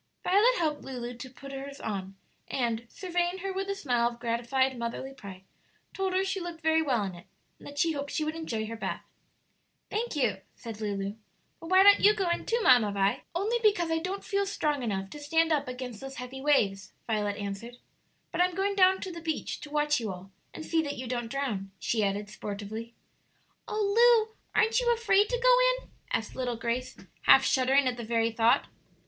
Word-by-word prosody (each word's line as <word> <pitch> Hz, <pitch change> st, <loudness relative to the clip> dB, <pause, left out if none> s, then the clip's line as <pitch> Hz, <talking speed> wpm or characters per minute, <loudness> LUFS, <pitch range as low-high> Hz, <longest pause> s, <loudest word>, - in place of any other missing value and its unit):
Violet 425 Hz, +7 st, +4 dB
helped 305 Hz, -3 st, 0 dB
Lulu 245 Hz, -2 st, -6 dB
to 255 Hz, +2 st, -8 dB
put 275 Hz, +2 st, -11 dB
her's 275 Hz, +1 st, -7 dB
on, 195 Hz, -2 st, -4 dB, 0.3 s
and, 235 Hz, -2 st, -1 dB
surveying 355 Hz, -1 st, -1 dB
her 390 Hz, -1 st, -2 dB
with 390 Hz, +1 st, -3 dB
a 395 Hz, -, -1 dB
smile 245 Hz, -10 st, +1 dB
of 235 Hz, 0 st, -12 dB
gratified 245 Hz, +3 st, 0 dB
motherly 235 Hz, +3 st, -4 dB
pride, 195 Hz, -7 st, -11 dB, 0.5 s
told 385 Hz, -1 st, -1 dB
her 380 Hz, +1 st, +2 dB
she 385 Hz, 0 st, -2 dB
looked 345 Hz, -2 st, -7 dB
very 320 Hz, 0 st, +3 dB
well 255 Hz, -8 st, +1 dB
in 190 Hz, -2 st, -4 dB
it, 175 Hz, 0 st, -13 dB, 0.3 s
and -, -, -12 dB
that 285 Hz, -, -10 dB
she 330 Hz, +3 st, +3 dB
hoped 285 Hz, -2 st, -4 dB
she 310 Hz, -, -1 dB
would 310 Hz, +1 st, -2 dB
enjoy 235 Hz, -10 st, -3 dB
her 225 Hz, +1 st, -6 dB
bath. 225 Hz, -, -4 dB, 0.9 s
"Thank 450 Hz, -2 st, -2 dB
you," 240 Hz, -9 st, +1 dB, 0.2 s
said 225 Hz, -2 st, -8 dB
Lulu; 200 Hz, 0 st, -3 dB, 0.4 s
"but 330 Hz, -, -9 dB
why 375 Hz, +1 st, +7 dB
don't 405 Hz, 0 st, +8 dB
you 420 Hz, +1 st, +6 dB
go 385 Hz, -4 st, 0 dB
in -, -, -2 dB
too, 470 Hz, -, +1 dB
Mamma 240 Hz, -5 st, +6 dB
Vi?" 200 Hz, 0 st, +1 dB
"Only 430 Hz, +7 st, +1 dB
because 375 Hz, -7 st, +2 dB
I 325 Hz, -, +2 dB
don't 370 Hz, +4 st, -4 dB
feel 400 Hz, -1 st, 0 dB
strong 300 Hz, -7 st, -1 dB
enough 195 Hz, -5 st, -3 dB
to 295 Hz, -, -8 dB
stand 325 Hz, +3 st, +2 dB
up 295 Hz, -4 st, +1 dB
against 250 Hz, -3 st, -6 dB
those 270 Hz, 0 st, -7 dB
heavy 255 Hz, +1 st, -7 dB
waves," 205 Hz, -9 st, +1 dB
Violet 210 Hz, -2 st, -1 dB
answered. 205 Hz, +4 st, -6 dB, 0.5 s
"But -, -, 0 dB
I 360 Hz, -, +5 dB
am 360 Hz, -, -9 dB
going 395 Hz, +2 st, 0 dB
down 380 Hz, -1 st, +4 dB
to 380 Hz, -, -4 dB
the 335 Hz, -1 st, -8 dB
beach 320 Hz, -1 st, -3 dB
to 300 Hz, -, -9 dB
watch 295 Hz, -1 st, +1 dB
you 220 Hz, -4 st, -3 dB
all, 185 Hz, +1 st, -10 dB, 0.2 s
and 315 Hz, -, -8 dB
see 325 Hz, -1 st, +2 dB
that 285 Hz, -2 st, -4 dB
you 255 Hz, -, -5 dB
don't 240 Hz, -1 st, -3 dB
drown," 225 Hz, -8 st, -3 dB
she 220 Hz, -2 st, 0 dB
added, 200 Hz, +1 st, -1 dB
sportively. 215 Hz, +2 st, -6 dB, 0.7 s
"Oh 435 Hz, +2 st, +4 dB
Lu, 440 Hz, -, -25 dB, 0.2 s
aren't 450 Hz, +2 st, +4 dB
you 485 Hz, -1 st, +2 dB
afraid 420 Hz, -3 st, +3 dB
to -, -, 0 dB
go -, -, +4 dB
in?" -, -, -25 dB, 0.2 s
asked 220 Hz, -, -2 dB
little 245 Hz, -2 st, -2 dB
Grace, 235 Hz, +2 st, -3 dB, 0.3 s
half -, -, +8 dB
shuddering 265 Hz, +1 st, +3 dB
at 250 Hz, -1 st, -1 dB
the 235 Hz, -, -5 dB
very 230 Hz, 0 st, +1 dB
thought. 225 Hz, +1 st, +3 dB
275 Hz, 210 wpm, -29 LUFS, 230-370 Hz, 0.9 s, don't